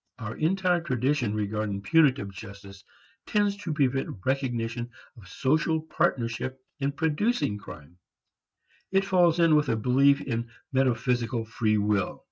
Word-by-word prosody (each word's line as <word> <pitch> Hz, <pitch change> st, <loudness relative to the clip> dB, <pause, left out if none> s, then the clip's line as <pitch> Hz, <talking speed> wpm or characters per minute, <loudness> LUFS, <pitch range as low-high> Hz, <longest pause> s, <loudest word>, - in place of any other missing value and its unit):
Our 115 Hz, -1 st, -6 dB
entire 180 Hz, +1 st, +1 dB
tradition 130 Hz, -5 st, 0 dB
regarding 105 Hz, -1 st, -2 dB
punitive 140 Hz, -7 st, +3 dB
justice 100 Hz, -1 st, -11 dB, 0.4 s
tends 205 Hz, -1 st, +1 dB
to 200 Hz, -5 st, -5 dB
prevent 135 Hz, -6 st, 0 dB
recognition 120 Hz, -3 st, -1 dB, 0.3 s
of 110 Hz, -7 st, -15 dB
social 155 Hz, -, +1 dB
partnership 130 Hz, -5 st, -1 dB, 0.2 s
in 140 Hz, 0 st, 0 dB
producing 160 Hz, -, 0 dB
crime; 80 Hz, -2 st, -12 dB, 0.9 s
it 195 Hz, 0 st, +2 dB
falls 175 Hz, -3 st, +3 dB
in 165 Hz, -2 st, +5 dB
with 150 Hz, -2 st, +2 dB
a 115 Hz, -, +2 dB
belief 135 Hz, +5 st, +3 dB
in 115 Hz, -2 st, -3 dB, 0.2 s
metaphysical 125 Hz, -2 st, 0 dB
free 110 Hz, -1 st, 0 dB
will. 105 Hz, -2 st, 0 dB
130 Hz, 125 wpm, -27 LUFS, 110-155 Hz, 0.9 s, in